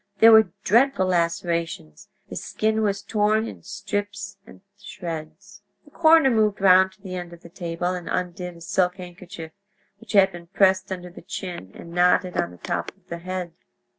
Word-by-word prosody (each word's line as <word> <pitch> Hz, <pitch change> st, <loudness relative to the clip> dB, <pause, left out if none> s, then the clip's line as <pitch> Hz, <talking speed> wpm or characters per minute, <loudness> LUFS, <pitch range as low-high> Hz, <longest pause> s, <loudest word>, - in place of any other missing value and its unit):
There 225 Hz, +3 st, +8 dB
were 220 Hz, -3 st, +7 dB
dreadful 235 Hz, -1 st, +3 dB
lacerations; 170 Hz, -, -2 dB, 0.2 s
the -, -, -8 dB
skin 220 Hz, 0 st, -1 dB
was 200 Hz, -2 st, 0 dB
torn 215 Hz, +1 st, +1 dB
in -, -, -9 dB
strips 205 Hz, -1 st, -5 dB
and -, -, -15 dB
shreds. 165 Hz, -6 st, -8 dB, 0.2 s
The 290 Hz, -, -19 dB
coroner 320 Hz, -4 st, +5 dB
moved 215 Hz, -3 st, +2 dB
round 190 Hz, -1 st, +5 dB
to -, -, -27 dB
the 185 Hz, -2 st, -7 dB
end 175 Hz, -1 st, -6 dB
of 170 Hz, -, -13 dB
the 170 Hz, -, -12 dB
table 175 Hz, 0 st, -3 dB
and 180 Hz, -2 st, -6 dB
undid 180 Hz, -1 st, -3 dB
a -, -, -16 dB
silk 180 Hz, +2 st, +1 dB
handkerchief, 175 Hz, -3 st, -9 dB, 0.5 s
which 230 Hz, -1 st, -10 dB
had 195 Hz, -1 st, +6 dB
been 170 Hz, -1 st, -11 dB
passed 190 Hz, +1 st, +2 dB
under 180 Hz, -1 st, -5 dB
the -, -, -12 dB
chin 175 Hz, -, -7 dB
and 170 Hz, -, -11 dB
knotted 180 Hz, +1 st, +3 dB
on 85 Hz, -, 0 dB
the 90 Hz, -, -14 dB
top 85 Hz, 0 st, -3 dB
of 190 Hz, -, -34 dB
the 170 Hz, -, -5 dB
head. 180 Hz, 0 st, -5 dB
185 Hz, 180 wpm, -24 LUFS, 170-205 Hz, 0.5 s, There